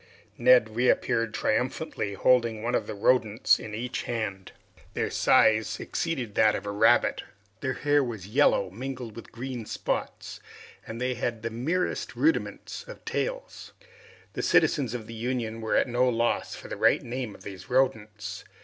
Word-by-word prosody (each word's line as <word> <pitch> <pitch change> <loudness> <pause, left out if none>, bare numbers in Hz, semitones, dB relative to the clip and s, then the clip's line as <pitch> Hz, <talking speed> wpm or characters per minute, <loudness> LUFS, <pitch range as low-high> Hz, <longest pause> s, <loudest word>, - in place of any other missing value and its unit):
Neb 125 -2 +5
reappeared 115 -2 +2
triumphantly 120 -2 -1
holding 115 -1 +2
one 120 +1 -1
of - - 0
the - - -5
rodents 110 +1 +3
in 105 -1 -7
each 125 +3 -3
hand. 100 -5 -4 0.4
Their - - -1
size 110 0 +3
exceeded 130 -11 -3
that 105 0 +4
of 95 - -5
a 100 - -3
rabbit, 115 +4 +3 0.4
their 130 -2 -2
hair 145 -1 +2
was 110 -7 -5
yellow, 105 -4 +2
mingled 125 +1 -6
with 115 - -10
green 120 -2 -6
spots, - - -4 0.5
and 115 +1 -6
they 125 +1 0
had 120 -2 -3
the 115 - -3
merest 160 +11 -2
rudiments 320 +2 -1
of - - -11
tails. - - -4 0.6
The - - -3
citizens 130 -7 +2
of 115 -3 -5
the 115 - -9
Union 115 -1 -3
were 110 - 0
at - - +3
no 125 +1 +2
loss 120 0 0
for - - -10
the - - -6
right - - +3
name 120 -3 -5
of - - -15
these 95 -2 -9
rodents. 110 -5 -1
120 Hz, 160 wpm, -27 LUFS, 110-130 Hz, 0.6 s, Neb